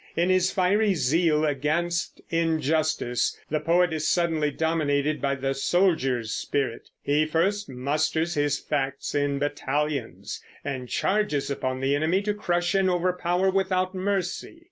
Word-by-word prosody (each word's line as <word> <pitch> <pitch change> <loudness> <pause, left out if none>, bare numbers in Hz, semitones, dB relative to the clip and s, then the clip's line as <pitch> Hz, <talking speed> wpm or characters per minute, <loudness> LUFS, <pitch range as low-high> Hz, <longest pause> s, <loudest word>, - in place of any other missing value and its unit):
In 175 +3 +2
his 185 0 +3
fiery 200 +2 +2
zeal 155 +1 +2
against 155 +5 -1
injustice 155 -6 0
the 155 - +1
poet 170 +2 +2
is 155 -1 -1
suddenly 165 -4 +1
dominated 150 -1 0
by 140 -1 +1
the 135 0 -1
soldier's 135 - +1
spirit. 135 -5 -2
He 150 +2 +2
first 190 +6 0
musters 155 +6 -1
his 145 -2 +1
facts 140 -2 -3
in 145 -1 0
battalions, 145 -2 -2 0.2
and 130 -3 -4
charges 190 -9 0
upon 130 -1 -2
the 135 +1 +2
enemy 165 +7 +1
to 210 0 0
crush 175 -4 0
and 195 -1 +3
overpower 180 +1 +1
without 185 -1 0
mercy. 190 - -2
160 Hz, 135 wpm, -26 LUFS, 145-180 Hz, 0.2 s, his